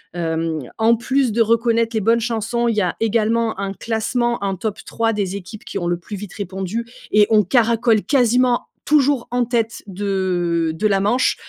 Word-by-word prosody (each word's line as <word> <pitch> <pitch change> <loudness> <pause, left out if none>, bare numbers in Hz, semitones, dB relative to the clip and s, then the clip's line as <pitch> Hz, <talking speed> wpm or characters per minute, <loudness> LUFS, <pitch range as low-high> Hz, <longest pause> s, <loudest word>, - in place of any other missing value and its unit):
hem, 165 -2 -2 0.2
en 225 +1 +4
plus 260 +1 +1
de 230 +2 +1
reconnaître 230 0 +1
les 220 - +1
bonnes 230 +3 +3
chansons, 235 +1 -1
il 230 - +1
y 210 - +2
a 180 -2 -1
également 225 -1 +1
un 195 0 -3
classement. 235 +2 -1
Un 195 - -1
top 205 +3 -4
3 225 0 0
des 200 -2 -2
équipes 200 +2 -9
qui - - -5
ont 175 - -2
le 175 0 0
plus 180 +4 -8
vite 200 -1 -8
répondu 195 +3 -4 0.3
et 210 -1 +5
on 215 -1 +5
caracole 230 +1 +2
quasiment 250 -1 +2 0.2
toujours 285 -4 +2
en 245 0 +1
tête 230 -1 -2
de 180 -4 -1
de 215 +7 0
la 195 -1 +2
manche, 235 +6 +2
220 Hz, 190 wpm, -20 LUFS, 195-235 Hz, 0.3 s, et